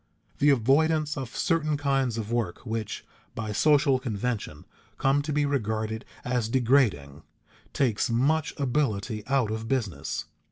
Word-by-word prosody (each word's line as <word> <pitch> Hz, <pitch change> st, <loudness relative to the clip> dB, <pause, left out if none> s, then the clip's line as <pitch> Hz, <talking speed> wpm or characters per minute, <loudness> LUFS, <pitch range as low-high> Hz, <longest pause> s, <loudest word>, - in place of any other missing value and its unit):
The 145 Hz, -, +5 dB
avoidance 150 Hz, +4 st, +3 dB
of 130 Hz, -4 st, -6 dB
certain 155 Hz, -3 st, +1 dB
kinds 135 Hz, -4 st, 0 dB
of 110 Hz, 0 st, -4 dB
work 120 Hz, -4 st, -2 dB
which, 110 Hz, -2 st, -4 dB, 0.3 s
by 110 Hz, -2 st, -3 dB
social 140 Hz, +3 st, +3 dB
convention, 110 Hz, -, -3 dB, 0.3 s
come 135 Hz, +1 st, +2 dB
to 150 Hz, +2 st, -4 dB
be 145 Hz, 0 st, +2 dB
regarded 110 Hz, -5 st, -2 dB, 0.2 s
as 125 Hz, -3 st, 0 dB
degrading, 115 Hz, -, +2 dB, 0.5 s
takes 120 Hz, -6 st, +1 dB
much 140 Hz, +7 st, +1 dB
ability 115 Hz, -6 st, -1 dB
out 135 Hz, -5 st, +1 dB
of 110 Hz, +1 st, -4 dB
business. 105 Hz, -, -2 dB
125 Hz, 130 wpm, -27 LUFS, 110-140 Hz, 0.5 s, The